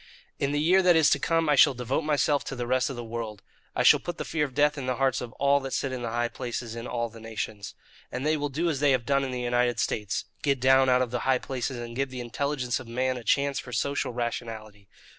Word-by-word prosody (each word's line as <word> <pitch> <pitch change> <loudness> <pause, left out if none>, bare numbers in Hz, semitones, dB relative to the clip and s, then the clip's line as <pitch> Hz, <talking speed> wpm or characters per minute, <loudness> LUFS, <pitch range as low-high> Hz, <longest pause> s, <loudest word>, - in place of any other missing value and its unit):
"In 140 - 0
the 145 - 0
year 180 +5 +4
that 180 -2 +5
is 160 -2 +5
to - - +3
come 165 -1 +1
I 150 - +4
shall 135 - +6
devote 125 +4 -1
myself 145 -2 +1
to - - -5
the 120 -1 -3
rest 130 +1 +1
of 135 - -5
the 120 - -6
world. 115 -3 -6 0.3
I - - +1
shall - - +7
put 175 - -6
the - - -4
fear 155 -2 -1
of 130 -3 -10
death 150 +1 +3
in 135 -3 -5
the 130 - 0
hearts 135 0 +1
of 120 -2 -6
all 140 0 +3
that 135 -1 -6
sit 135 - -1
in 130 -1 -4
the 120 - -3
high 120 +1 0
places 120 -1 -5
in 115 +1 -6
all 120 -1 -2
the 115 +1 -13
nations. 110 -2 -6 0.4
And 125 +3 -4
they 155 +1 +3
will 145 -1 -2
do 160 +6 -1
as 155 -5 0
they 145 -1 +4
have 125 -3 0
done 140 +1 +2
in 135 - -3
the 125 -1 -3
United 120 -1 +1
States 105 -3 -1 0.2
get 140 -3 +1
down 130 +1 +5
out 125 0 +4
of 120 - -5
the 125 - -1
high 130 +1 +2
places 130 0 -4
and 120 0 -7
give 135 +1 -1
the 130 -1 -7
intelligence 125 +1 -2
of 130 - -10
man 130 +2 -1
a 125 - -7
chance 140 +4 +1
for 125 - -9
social 140 +1 -1
rationality. 115 -4 -5
130 Hz, 275 wpm, -27 LUFS, 120-140 Hz, 0.4 s, shall